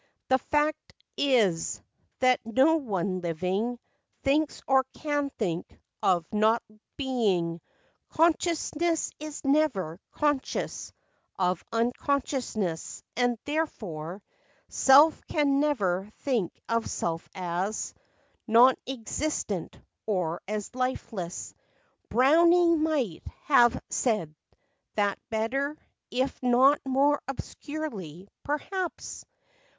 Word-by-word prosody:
The 260 0 +4
fact 300 +3 -1 0.2
is, 220 -12 +2 0.4
that 255 -1 +4
no 265 +8 +4
one 195 - -2
living 185 +8 -1 0.5
Thinks, 290 +2 +1
or 265 0 +5
can 290 -2 -1
think, 175 -6 -3 0.2
of 175 -3 +2
not 220 +2 +3 0.3
being. 195 - 0 0.5
Consciousness 330 0 +1
is 305 -1 -7
never 260 - +1
conscious 295 -3 -1 0.5
Of 180 -2 0
unconsciousness; 235 - -1
and 245 -1 +1
therefore 200 - -3 0.5
Self 290 +4 +6
can 280 -2 +2
never 205 -10 0
think 240 -11 -1
of 230 0 0
self 165 -1 -3
as 185 +3 -2 0.5
Non 240 +3 +7 0.2
existent, 235 - -3 0.3
or 180 -5 -1
as 210 +2 -4
lifeless. 230 -8 -3 0.6
Browning 335 +5 +5
might 285 - 0 0.2
have 240 -5 +5
said 210 - 0 0.6
that 205 -2 +1
better, 270 +7 -1 0.3
If 260 +2 -1
not 255 +3 +5
more 280 +2 +3
obscurely, 230 - -6
perhaps. 345 +5 -4
245 Hz, 90 wpm, -28 LUFS, 195-290 Hz, 0.6 s, Non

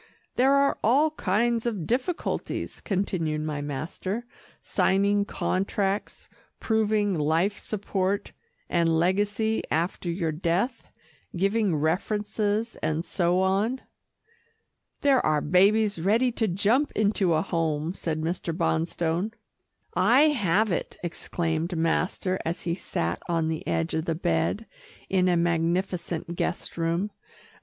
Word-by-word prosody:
"There 265 +2 +4
are 280 0 +2
all 285 +8 +4
kinds 230 -1 0
of 205 -8 -2
difficulties," 255 - -2
continued 175 -6 -1
my 150 -1 -3
master, 165 - -4 0.3
"signing 200 +1 +2
contracts, 195 0 -2 0.3
proving 215 -2 +1
life 165 +6 +1
support 195 -1 -2 0.4
and 165 -2 +2
legacy 205 +5 +1
after 170 +2 -1
your 170 -2 -1
death, 180 - -1 0.5
giving 195 0 +1
references 210 +7 0
and 155 +2 -1
so 180 0 +1
on." 200 +7 +1 1.2
"There 275 -3 +4
are 155 -1 +2
babies 200 +5 +3
ready 225 +8 +2
to 225 -1 0
jump 210 +10 +2
into 200 -5 +2
a 155 - +1
home," 165 -3 -1
said 160 -4 -3
Mr. 165 0 -2
Bonstone. 170 +3 0 0.6
"I 245 +12 +5
have 210 - +2
it," 170 - -3
exclaimed 170 0 -2
master 180 +3 0
as 165 +2 -3
he 170 - -1
sat 85 - -3
on 165 -2 +1
the 160 -1 -4
edge 80 -1 0
of 160 0 -1
the 165 - -1
bed, 85 - 0 0.4
in 185 -1 +3
a 175 -1 +3
magnificent 170 0 -1
guest 175 - -2
room. 170 +5 -1
185 Hz, 120 wpm, -26 LUFS, 165-210 Hz, 1.2 s, I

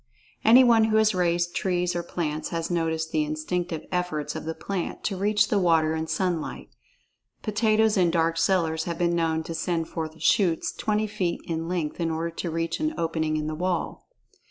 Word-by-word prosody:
Anyone 235 -1 +7
who 220 0 +2
has 220 -1 +4
raised 175 -1 +1
trees 180 -2 0
or 175 - 0
plants 155 -3 -3
has 165 0 -3
noticed 160 -1 -1
the 155 - +1
instinctive 160 +2 -3
efforts 180 -5 -2
of - - -5
the 160 0 -3
plant 195 -3 -4
to 200 - -1
reach 210 +2 +2
the 205 - +2
water 165 -3 +3
and 160 0 -3
sunlight. 180 -4 -2 0.7
Potatoes 215 0 +2
in 180 -2 +4
dark 165 0 +1
cellars 165 -3 +1
have 170 -1 -3
been 170 -1 +1
known 160 -1 0
to 165 - -6
send 165 0 -2
forth 160 -1 -5
shoots 170 +1 +2
twenty 215 -2 -1
feet 200 -5 -2
in 165 0 -3
length 170 -3 -2
in 165 -1 0
order 165 +1 -2
to 170 +1 -4
reach 165 +1 -2
an 310 0 -1
opening 160 -1 -1
in 155 - -2
the 155 - -3
wall. 180 +2 -3
170 Hz, 185 wpm, -26 LUFS, 160-190 Hz, 0.7 s, Anyone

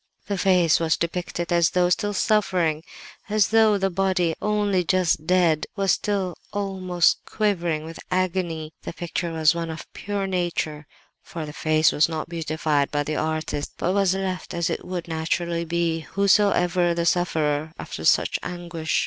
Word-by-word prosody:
"The 200 - -2
face 180 -4 +3
was 165 -1 +1
depicted 175 0 -3
as 170 -1 +4
though 180 -1 +2
still 205 +3 0
suffering; 180 -8 +1 0.5
as 210 -1 +3
though 220 -2 +4
the 195 -1 0
body, 180 -2 +1
only 205 -3 +1
just 175 -3 +1
dead, 175 -4 +3
was 195 -2 +2
still 195 -3 0 0.2
almost 185 -3 +1
quivering 175 -7 -1
with 165 0 -9
agony. 175 -4 -1
The - - -6
picture 175 0 -3
was 160 0 +3
one 170 -1 -3
of 160 -1 -6
pure 200 -1 -3
nature, 175 -5 -2 0.3
for 165 -2 -7
the 150 - -8
face 155 0 +3
was 150 - +3
not 160 0 -4
beautified 155 -3 0
by 145 0 0
the 155 +1 -3
artist, 155 -2 -2
but 180 - 0
was 195 -2 +2
left 190 -2 -4
as 170 -1 0
it - - -3
would 180 -2 -5
naturally 170 +1 -1
be, 170 0 0
whosoever 180 -2 +2
the 170 0 -1
sufferer, 160 -4 +1
after - - -7
such - - +3
anguish. 170 -3 -3
175 Hz, 160 wpm, -24 LUFS, 160-185 Hz, 0.5 s, as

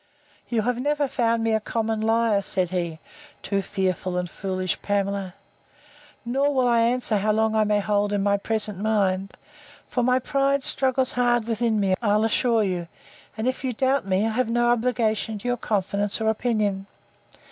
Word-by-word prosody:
You 230 -3 0
have 245 +1 -1
never 290 +2 0
found 230 -3 0
me 225 0 +1
a 220 - +2
common 220 0 -2
liar, 225 -2 +2
said 185 -2 -2
he, 170 -3 -2 0.5
(too 200 -1 0
fearful 185 -2 -2
and 180 0 -1
foolish 185 0 -3
Pamela!) 200 -2 -2 0.9
nor 270 +4 +1
will 260 -3 +2
I 235 -1 +3
answer 235 -1 +1
how 215 +2 +1
long 220 +1 +1
I 215 -1 +3
may 210 0 +2
hold 205 0 0
in 205 -1 0
my 200 0 +2
present 210 -1 -2
mind; 195 -3 0 0.5
for 250 - -1
my 250 +1 +3
pride 275 +1 0
struggles 260 -1 +2
hard 240 -2 +1
within 225 -1 0
me, 195 -2 +2
I'll 210 -1 +2
assure 225 0 +2
you; 180 -3 -2 0.5
and 220 +3 -2
if 255 +1 -2
you 255 -2 -1
doubt 265 -1 0
me, 190 +2 +1
I - - +1
have 245 +1 0
no 240 +1 +2
obligation 225 -2 0
to 205 - -7
your 245 - +1
confidence 205 -1 -1
or 220 0 +1
opinion. 210 -4 -1
220 Hz, 180 wpm, -24 LUFS, 200-240 Hz, 0.9 s, I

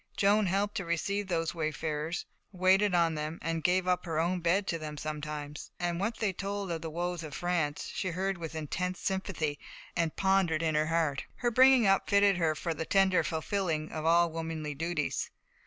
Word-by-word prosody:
Joan 205 0 +4
helped 200 +3 0
to 195 - -2
receive 200 +4 -1
those 165 -3 -1
wayfarers, 155 0 -2 0.3
waited 190 +1 +3
on 170 -1 +3
them, 155 +1 -4 0.2
gave 180 0 +2
up 180 -1 +2
her 160 -2 -1
own 175 +2 +1
bed 175 +4 +2
to 165 - -2
them 150 -1 -6
sometimes; 150 -1 -5
and 175 -1 -1
what 215 +4 -1
they 210 -4 0
told 200 0 -3
of 165 -1 -3
the 165 - -4
woes 175 +1 -3
of 155 -3 -7
France 170 -4 -1
she 190 - -2
heard 185 +1 -1
with 160 -1 -6
intense 180 +4 -2
sympathy, 185 -6 -2 0.4
and 165 -2 0
pondered 190 -5 +2
in 160 -1 +1
her 155 0 +2
heart. 160 -4 0
Her 240 -1 0
bringing 260 0 +6
up 195 0 +3
fitted 200 -2 +5
her 160 -3 +1
for 165 +2 -2
the 160 - -3
tender 190 +1 +3
fulfilling 160 -1 -2
of 155 - -4
all 170 +1 +4
womanly 160 -2 -4
duties. 165 0 -2
170 Hz, 190 wpm, -30 LUFS, 155-190 Hz, 0.4 s, bringing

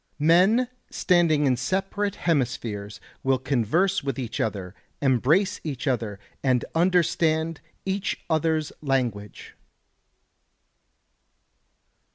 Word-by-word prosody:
Men 185 +11 +4 0.2
standing 170 -5 +2
in 130 -2 +3
separate 195 +9 -1
hemispheres 120 - -2 0.2
will 135 0 +2
converse 140 - +1
with 135 -3 -3
each 120 -4 -4
other, 95 -4 -2 0.3
embrace 140 - +2
each 140 -3 -4
other, 115 -7 -1 0.2
and 130 -3 +1
understand 165 -2 +1 0.2
each 195 0 -2
other's 160 -1 0
language. 120 -8 -2
145 Hz, 90 wpm, -25 LUFS, 125-175 Hz, 0.3 s, Men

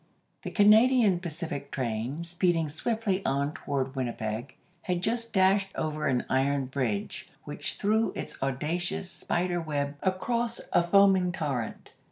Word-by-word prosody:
* - - -45
The - - -5
Canadian 215 -1 +5
Pacific 160 -5 -5
train, 125 +4 -3
speeding 170 -2 +1
swiftly 200 +3 -1
on 140 +2 0
toward 135 -2 -3
Winnipeg, 120 0 -3 0.3
had 180 0 -2
just 230 +2 0
dashed 195 +1 +3
over 155 -1 -2
an 125 -2 +1
iron 135 +1 +1
bridge 125 -6 -3
which - - -1
threw 220 +2 +1
its - - -4
audacious 155 +8 -1
spider 175 0 -1
web 145 -2 -2
across 235 +5 -1
a - - +5
foaming 190 0 +4
torrent. 140 - -4
170 Hz, 135 wpm, -28 LUFS, 135-195 Hz, 0.3 s, Canadian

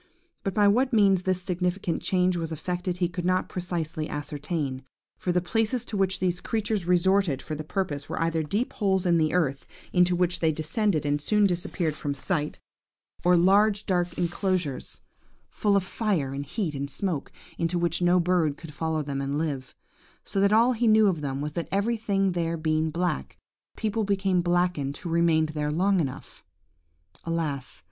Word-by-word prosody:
But 195 - -2
by 205 -1 +5
what 250 +6 +3
means 200 -5 +4
this 185 -1 -1
significant 180 -1 -1
change 180 -1 +2
was 165 -2 -3
effected 180 +3 -3
he 175 -1 +1
could 175 0 -5
not 185 +1 +1
precisely 165 -4 -3
ascertain; 145 -2 -3 0.4
for 180 - -1
the 180 0 +1
places 225 +5 0
to 220 - -6
which 190 -1 +2
these 175 -1 0
creatures 215 -4 -1
resorted 180 -4 +3
for 155 - -6
the 155 0 -4
purpose 150 -4 -3
were - - -3
either 165 -1 +1
deep 205 +11 -2
holes 190 -3 +1
in 170 -2 +4
the 155 -1 +2
earth, 145 -7 0 0.3
into 180 0 +4
which 180 0 +1
they 160 -1 +3
descended, 155 +2 0
and 145 0 0
soon 210 +6 +3
disappeared 175 -3 -1
from 145 -1 -4
sight, 150 0 -2 0.7
or 180 0 +5
large 205 +4 +4
dark 175 -2 0
enclosures, 175 -4 -2 0.5
full 205 -2 +1
of 195 - +1
fire 185 - -1
and 140 +1 -5
heat 185 - -2
and 140 0 -4
smoke, 155 0 -3 0.3
into 170 +1 0
which 170 0 0
no 175 +1 +4
bird 170 -4 +1
could 165 -3 -10
follow 160 0 -1
them 140 -1 -3
and 140 +1 -2
live; 140 -5 -3 0.5
so 195 - -3
that 200 0 +4
all 230 +4 +5
he 235 0 +1
knew 215 0 +6
of 180 -6 +1
them 135 -1 -3
was 150 +1 -3
that 170 +2 -4
everything 200 -2 +1
there 170 -1 -1
being 155 0 0
black, 175 +3 -2 0.4
people 220 0 -1
became 195 -2 +1
blackened 175 -5 0
who 180 - -7
remained 165 -2 +3
there 150 -1 -2
long 185 +5 +2
enough. 135 -6 -5 0.8
Alas! 150 - -3
175 Hz, 180 wpm, -26 LUFS, 155-195 Hz, 0.8 s, knew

